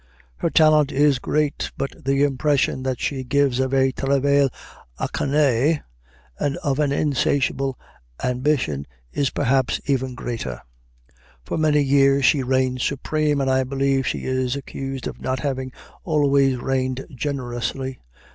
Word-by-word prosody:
Her - - 0
talent 155 -2 +4
is 140 -1 +3
great, 150 +2 -1
but 135 - -2
the 135 +1 +2
impression 145 -1 +1
that 130 -1 -2
she 135 -2 -2
gives 140 -1 +1
of 130 0 0
a 135 -1 +3
travail 140 +1 +2 0.5
acharné 145 +1 +1 0.6
and 140 -1 -1
of 140 0 -1
an 145 -2 +2
insatiable 135 -2 0 0.5
ambition 125 - 0 0.3
is 140 -2 +1
perhaps 130 +1 +1
even 130 -2 -1
greater. 115 - -5 0.9
For - - -3
many 150 -1 +3
years 140 0 +4
she 140 +1 +4
reigned 130 0 0
supreme, 150 +2 0
and 135 -1 +1
I 130 0 +3
believe 135 0 0
she - - -2
is 130 0 0
accused 135 -1 -6
of - - -6
not 130 0 -2
having 130 -2 -3 0.3
always 140 -4 +2
reigned 130 +1 -2
generously. 130 -1 -3
135 Hz, 135 wpm, -22 LUFS, 130-140 Hz, 0.9 s, talent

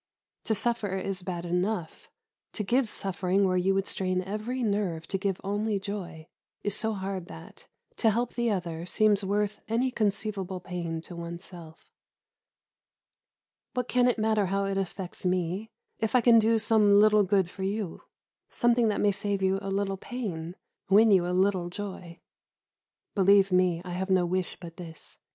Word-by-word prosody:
To 220 - +1
suffer 210 -4 0
is 190 0 -3
bad 175 -1 -5
enough; 180 0 -2 0.4
to 210 - -2
give 240 +3 +1
suffering 195 0 0
where 185 - +1
you 190 +2 +2
would 195 0 +1
strain 185 -2 -1
every 215 +6 -3
nerve 200 -7 -1
to 195 - 0
give 195 -1 -1
only 205 +2 -1
joy 190 -5 -6 0.4
is 205 -1 0
so 220 0 0
hard 190 -2 -4
that, 80 - -12 0.3
to 225 - +4
help 235 +3 0
the 240 -1 0
other, 170 -5 -2
seems 210 0 +3
worth 205 +1 -1
any 240 +4 +1
conceivable 205 -4 -1
pain 175 -3 -4
to 175 - -10
oneself. 170 -1 -9 1.8
What 250 -1 -1
can 250 0 +3
it 245 - +2
matter 215 -2 +2
how 195 +1 0
it 195 0 -1
affects 190 -1 -5
me, 185 +3 -1 0.3
if 220 +2 -1
I 250 - +6
can 230 -1 +7
do 225 +1 +3
some 215 -2 +4
little 215 0 +6
good 195 -2 +2
for 190 - -10
you; 195 -1 -3 0.5
something 240 -1 +2
that 210 - 0
may 205 - +4
save 200 0 -1
you 190 +1 +2
a 195 - -4
little 195 0 -1
pain, 180 -8 -5 0.3
win 215 +3 +6
you 180 -3 +4
a - - -1
little 185 -1 +1
joy? 180 -3 -7 0.9
Believe 195 0 +5
me, 180 -2 +2
I 180 - -6
have 190 +2 -3
no 185 -2 +3
wish 185 +1 -1
but 170 -2 -10
this. 165 -3 -8
195 Hz, 170 wpm, -28 LUFS, 180-215 Hz, 1.8 s, can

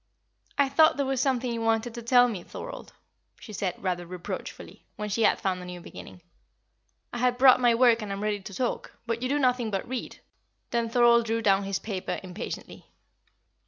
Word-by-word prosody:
"I 280 -1 +4
thought 315 +3 +4
there 280 - 0
was 265 -1 0
something 255 -3 0
you 230 - -3
wanted 225 +1 0
to 235 - -7
tell 245 +1 +5
me, 210 -7 -4
Thorold," - - -9 0.5
she 215 - -11
said, 185 -2 -2
rather 180 -2 -2
reproachfully, 180 0 -8
when 210 0 -4
she 215 +3 -1
had 215 - +4
found 185 -2 -1
a - - -8
new 180 0 -7
beginning. 175 0 -12 0.9
"I 240 - -4
have 250 0 +2
brought 255 0 +7
my 240 -1 +4
work 240 -1 +4
and 210 -2 -5
am 195 +1 -4
ready 210 -1 -1
to 195 +1 -10
talk, 250 -2 -3
but 230 0 -2
you 255 - -1
do 290 - +1
nothing 250 -4 +1
but 195 -2 -3
read." 255 0 -5 0.5
Then 235 -1 0
Thorold 235 -1 +4
threw 225 0 -1
down 195 -1 +3
his 195 0 -1
paper 195 -2 -4
impatiently. 185 +2 -7
230 Hz, 195 wpm, -27 LUFS, 195-250 Hz, 0.9 s, brought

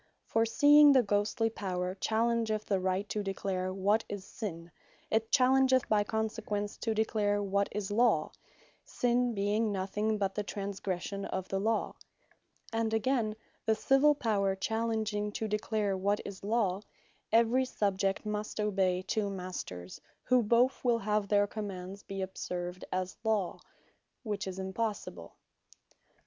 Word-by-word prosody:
For 225 0 +1
seeing 290 +4 +7
the 260 -2 +5
Ghostly 210 +2 +1
Power 185 -4 -3
challengeth 220 +1 0
the 195 -2 +1
Right 185 +2 -1
to 210 - -1
declare 195 -1 -2
what 200 +4 +2
is 200 -2 -5
Sinne 170 -6 -6 0.4
it 220 0 +1
challengeth 260 0 +4
by 210 -1 +3
consequence 210 -1 -2
to 225 -2 -2
declare 205 -2 +1
what 200 0 0
is 205 -1 -3
Law, 235 +3 +3 0.5
(Sinne 245 -1 0
being 205 +2 +1
nothing 210 +3 -1
but 195 -2 -1
the 210 - -1
transgression 200 -1 -4
of 190 0 -4
the 195 - -1
Law;) 220 +2 0 0.8
and 225 -1 0
again, 220 -2 +1 0.3
the 220 - +4
Civill 270 +6 +4
Power 200 -7 +1
challenging 220 0 -1
to 220 - -2
declare 210 -1 0
what 200 +2 +1
is 195 -1 -8
Law, 205 -3 +1 0.5
every 230 +3 +4
Subject 195 -5 -1
must 210 0 -3
obey 190 -3 +1
two 205 +1 -1
Masters, 180 - -6 0.2
who 255 -1 +4
bothe 235 +4 +4
will 240 -2 +3
have 210 -1 0
their 205 0 +4
Commands 200 -2 -6
be 195 -1 -5
observed 180 -1 -5
as 185 0 -2
Law; 215 -5 0 0.6
which 210 -3 -3
is 185 -1 -5
impossible. 200 +3 -4
210 Hz, 140 wpm, -31 LUFS, 195-225 Hz, 0.8 s, seeing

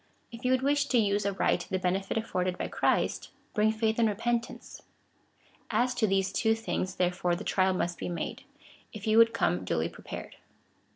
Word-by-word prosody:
If 230 +2 -10
you 250 - +1
would 260 0 +2
wish 285 +1 +2
to 250 - +2
use 205 -2 +2
aright 190 -3 0
the 190 - 0
benefit 190 +3 -1
afforded 185 -5 -1
by - - -3
Christ, - - 0 0.2
bring 215 +1 +3
faith 220 0 0
and 225 -1 +4
repentance. 235 +3 -3 0.9
As 250 +1 +1
to 245 -3 +1
these 195 -1 +1
two 225 +1 +2
things, 190 -4 -3
tlierefore, 180 -1 0
the - - -6
trial 190 -1 +2
must 175 -1 -2
be - - -3
made, 175 - -4 0.5
if 215 -2 -8
you 220 +1 +4
would 230 0 +7
come 90 - 0
duly 80 -2 -1
prepared. - - -9
205 Hz, 180 wpm, -29 LUFS, 185-230 Hz, 0.9 s, would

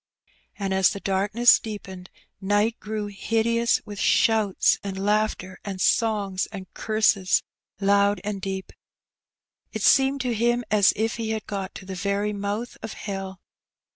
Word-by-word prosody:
And, 195 -2 -2
as 190 -1 +4
the 200 - -5
darkness 205 +5 +3
deepened, 190 -4 -8 0.3
night 205 +4 +1
grew 215 0 -4
hideous 225 +3 0
with 205 -1 -8
shouts, 220 -4 +3
and 195 -1 -5
laughter, 210 -3 0
and 195 -2 -5
songs, 205 -3 +1
and 195 -3 -8
curses 215 -4 +2 0.4
loud 200 +1 +3
and 205 -2 -4
deep. 190 -1 -5 1.0
It - - -4
seemed 270 0 +4
to 250 -2 -1
him 240 +2 +1
as 210 -2 +5
if 225 +2 -1
he 225 -1 -3
had 220 -1 -3
got 195 -2 -5
to 190 - -9
the 190 - -6
very 200 +3 -1
mouth 205 +4 -4
of 225 - -6
hell. 195 -2 -6
205 Hz, 145 wpm, -24 LUFS, 195-220 Hz, 1.0 s, as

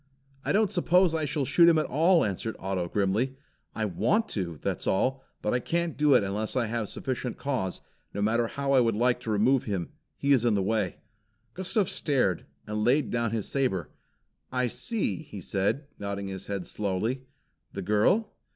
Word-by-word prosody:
"I - - 0
don't 210 0 +3
suppose 180 -2 +3
I 160 -1 0
shall 145 -1 -1
shoot 170 +5 +6
him 165 - +4
at 155 - +2
all," 165 +5 +4
answered 105 +3 -3
Otto 95 -2 -2
grimly. 105 +8 0 0.4
"I 110 - 0
want 205 - +1
to, 85 -6 -3
that's - - -2
all, 130 +7 +1 0.2
but 105 - +1
I 125 - +2
can't 170 +3 -1
do 145 -2 +4
it 120 - +5
unless 105 +4 -2
I 125 -2 +2
have 110 -1 -2
sufficient 125 -2 -3
cause, 125 -10 -2 0.3
no 100 - -5
matter 115 +3 +2
how 140 +3 -3
much 135 - +5
I - - +6
would 115 -3 +2
like 125 +2 +2
to 115 - -6
remove 115 +5 +3
him. 95 -5 -3 0.3
He 140 - 0
is 125 -4 +3
in 115 -3 +3
the 100 - +1
way." 105 -2 0 0.6
Gustav 190 +2 0
stared, 125 - 0 0.2
and 105 0 -2
laid 130 +6 +2
down 120 -1 0
his 110 -2 -2
saber. 95 - -1 0.6
"I 125 0 +1
see!" 225 - -1
he 145 -10 -9
said, 100 - -1
nodding 100 -1 -4
his 95 -1 -6
head 100 -3 -3
slowly. 110 +6 -2 0.5
"The 100 - -4
girl?" 110 - +2
120 Hz, 190 wpm, -28 LUFS, 100-140 Hz, 0.6 s, shoot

